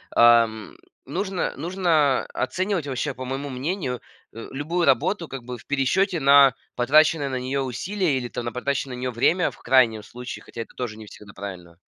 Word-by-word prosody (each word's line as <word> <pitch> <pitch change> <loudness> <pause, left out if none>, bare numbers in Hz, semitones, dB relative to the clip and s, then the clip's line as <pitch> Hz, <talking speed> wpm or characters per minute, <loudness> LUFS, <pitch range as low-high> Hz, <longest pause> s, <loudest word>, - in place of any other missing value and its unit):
ам, 115 -2 +4 0.3
нужно 190 +5 -2
нужно 160 -5 +1
оценивать 185 +3 -1
вообще, 135 +2 -2
по 130 0 -7
моему 135 +2 -4
мнению, 130 0 -3 0.3
а, 115 - -8
любую 165 +6 -1
работу 165 +6 +2
как 135 -4 -7
бы 125 +1 -6
в - - -17
пересчёте 165 +7 +1
на 140 -1 +6 0.2
потраченное 150 +4 +3
на 130 -1 -2
неё 130 +2 -2
усилие 160 - -1
или, 125 -1 -3
там, 120 0 -5
на 120 - -2
потраченное 130 +1 -2
на - - -8
неё 130 0 -2
время 165 +10 +2
в - - -17
крайнем 120 -4 +3
случае, 125 +3 -8
хотя 115 - -8
это 115 - -9
тоже 115 -4 -5
не 110 - -10
всегда 105 -1 -13
правильно. 90 -4 -9
135 Hz, 180 wpm, -24 LUFS, 120-155 Hz, 0.3 s, на